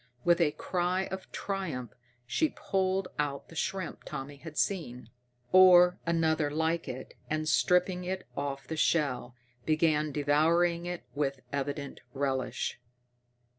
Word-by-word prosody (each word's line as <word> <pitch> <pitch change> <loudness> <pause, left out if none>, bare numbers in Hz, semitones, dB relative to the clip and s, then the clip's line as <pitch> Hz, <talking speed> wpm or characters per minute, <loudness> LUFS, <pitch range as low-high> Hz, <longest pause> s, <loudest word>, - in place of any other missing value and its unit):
With 175 0 +4
a 160 - +5
cry 180 +1 0
of 190 0 -6
triumph 165 - -4 0.3
she 305 - +1
pulled 190 -1 0
out 140 -1 -2
the 165 - -12
shrimp 190 +1 -3
Tommy 145 -1 -6
had 155 +1 -10
seen, 125 - -2 0.4
or 180 -1 +7
another 160 -2 +2
like 160 +2 0
it, 130 0 -7 0.2
and, 155 0 -1
stripping 180 +3 +3
it 185 +1 -4
off 140 -1 -3
the 160 - -3
shell, 135 -7 +1 0.3
began 155 -1 +2
devouring 165 +4 +2
it 175 -1 -4
with 140 -2 -1
evident 140 0 -3
relish. 135 -3 -2
160 Hz, 130 wpm, -30 LUFS, 140-180 Hz, 0.4 s, or